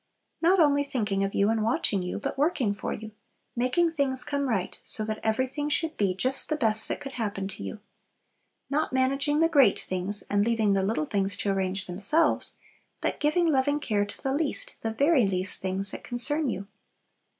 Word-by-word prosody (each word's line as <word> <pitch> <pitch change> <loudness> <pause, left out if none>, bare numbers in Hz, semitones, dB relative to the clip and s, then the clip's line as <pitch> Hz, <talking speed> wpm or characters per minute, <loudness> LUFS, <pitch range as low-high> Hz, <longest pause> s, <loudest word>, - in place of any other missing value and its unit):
Not 360 +3 +4
only 285 -3 +4
thinking 210 -8 -1
of 195 - -2
you 200 +2 +3
and 225 -1 0
watching 215 -3 +1
you, 180 0 -4
but 210 - -4
working 280 - +1
for 205 - -5
you; 220 0 -6 0.4
making 255 +8 +1
things 275 -5 0
come 280 -2 -2
right, 195 -6 -1
so 215 -3 +2
that 215 0 -3
everything 260 +6 -1
should 320 +1 -1
be 195 -3 0
just 255 +7 0
the 310 - +1
best 220 -6 +1
that - - -3
could 275 -2 -7
happen 205 -6 -3
to 190 - -9
you. 215 - -7 0.9
Not 300 +2 -1
managing 275 +3 +1
the 325 - +5
great 275 -10 +4
things, 185 +3 -2
and 205 0 +2
leaving 220 -2 +2
the 195 - +2
little 190 -5 0
things 195 +2 -1
to 200 - -1
arrange 190 0 -1
themselves; 200 - +2 0.4
but - - -2
giving 305 +4 +2
loving 285 +1 +1
care 205 -7 0
to - - -11
the 270 - 0
least, 325 - -1
the 225 - -2
very 275 0 +3
least 185 0 +1
things 190 +1 0
that - - -8
concern 280 +5 -1
you. 195 -3 -4
230 Hz, 195 wpm, -27 LUFS, 200-285 Hz, 0.9 s, the